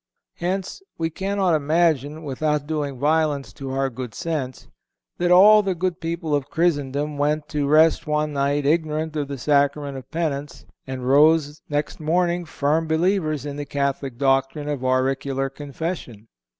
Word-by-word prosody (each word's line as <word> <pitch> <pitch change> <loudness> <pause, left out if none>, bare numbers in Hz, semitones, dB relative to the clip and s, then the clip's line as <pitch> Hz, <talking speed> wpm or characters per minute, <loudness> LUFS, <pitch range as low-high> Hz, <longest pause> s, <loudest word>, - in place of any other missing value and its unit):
Hence, 185 - -3 0.2
we 165 0 -1
cannot 190 0 0
imagine, 155 -1 +1
without 150 +1 -1
doing 145 -3 -3
violence 150 0 0
to 135 -1 -7
our 135 0 -1
good 125 -3 -7
sense, 145 -6 -4 0.5
that 175 0 +1
all 205 +4 +8
the 195 -3 -1
good 180 0 -2
people 165 -1 -3
of 145 -2 0
Christendom 145 -3 0
went 150 +1 0
to 145 -2 -1
rest 155 +2 +4
one 150 0 0
night 140 +1 0
ignorant 155 0 0
of 145 -2 -2
the 140 0 -5
Sacrament 140 +1 +1
of 130 0 -16
Penance, 150 -3 -3 0.2
and 130 -1 -5
rose 150 +2 +4
next 145 0 -2
morning 175 +2 0
firm 160 +1 0
believers 160 -3 0
in 145 -1 -5
the 145 - -4
Catholic 140 -3 -2
doctrine 135 +2 +1
of 145 -3 -3
auricular 135 +1 0
Confession. 145 - -6
150 Hz, 150 wpm, -23 LUFS, 140-160 Hz, 0.5 s, all